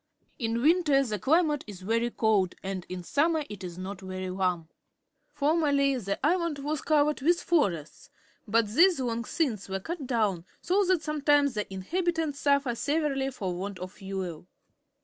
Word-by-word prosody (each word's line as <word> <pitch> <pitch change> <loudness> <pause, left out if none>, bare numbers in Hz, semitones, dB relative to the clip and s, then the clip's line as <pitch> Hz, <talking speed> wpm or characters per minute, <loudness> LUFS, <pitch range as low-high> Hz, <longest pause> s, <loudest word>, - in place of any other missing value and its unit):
In 230 -1 -1
winter 305 -4 +4
the 215 -5 -3
climatp 300 - +2
is 195 -3 -9
very 230 +4 +1
cold^ 210 -6 +1
and 190 -2 -4
in 180 -1 -5
summer 310 - +1
it 205 -2 -8
is 175 -1 -7
not 190 +1 -6
very 185 0 -5
warm. 180 -3 -1 0.6
Former 305 +1 +1
ly 280 -1 +3
the 200 -3 -3
island 335 -2 +1
was 295 +1 -3
covered 300 -2 +2
with 340 +5 +3
forests, 185 - -1 0.4
but 225 +1 +2
these 340 - +5
loiig 235 -2 -2
since 230 - -1
were 195 0 -2
cut 305 - -5
down, 210 -8 0 0.2
so 390 +3 +2
that 365 -3 +2
sometimes 290 -2 +2
the 210 -2 -4
inhabitants 320 - -1
suffer 280 -3 +2
severely 280 0 0
for 195 -8 -4
want 190 +2 -5
of 185 0 -7
fuel. 190 -4 -6
250 Hz, 165 wpm, -28 LUFS, 195-300 Hz, 0.6 s, these